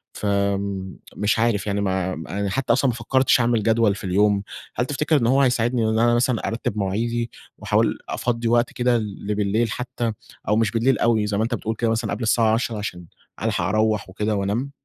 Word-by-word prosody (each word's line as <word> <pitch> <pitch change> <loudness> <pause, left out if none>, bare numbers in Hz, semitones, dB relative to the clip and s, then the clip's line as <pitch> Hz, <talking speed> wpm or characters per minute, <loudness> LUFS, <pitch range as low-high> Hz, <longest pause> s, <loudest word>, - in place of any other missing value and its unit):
فمش 100 +1 -1
عارف 110 -3 +1
يعني 100 0 0
مع 95 -2 -1
ما 80 +5 -6
أنا 100 -1 -1
حتى 130 +1 +1
أصلًا 135 +2 +2
ما 120 - -2
فكرتش 130 +3 +2
أعمل 115 -2 +2
جدول 110 -2 +3
في 100 - -10
اليوم. 100 +2 +2 0.3
هل 120 - 0
تفتكر 150 +3 +1
إن 115 - +1
هو 135 +3 +4
هيساعدني 120 -2 +2
إن 110 0 +1
أنا 120 0 +4
مثلًا 120 -1 +1
أرتب 115 -2 -3
مواعيدي 115 +4 -1 0.3
وأحاول - - +1
أفضّي 115 -1 -1
وقت 120 +1 +2
كده 120 -1 +2
لبليل 105 +1 -1
حتى، 120 0 -3 0.4
أو 105 - +3
مش 110 -2 +2
بالليل 120 +3 +2
أوي 110 -3 +2
زي 100 -1 -1
ما 110 - +1
أنت 120 +1 -1
بتقول 110 +1 -3
كده 115 +1 0
مثلًا 115 -2 -1
قبل 115 +3 -4
الساعة 110 0 +3
22:00 115 -1 -1
عشان 90 -4 -5 0.4
ألحق - - 0
أروّح 110 -2 +1
وكده 105 +2 -1
وأنام؟ 105 +8 -1
110 Hz, 195 wpm, -23 LUFS, 100-120 Hz, 0.4 s, هو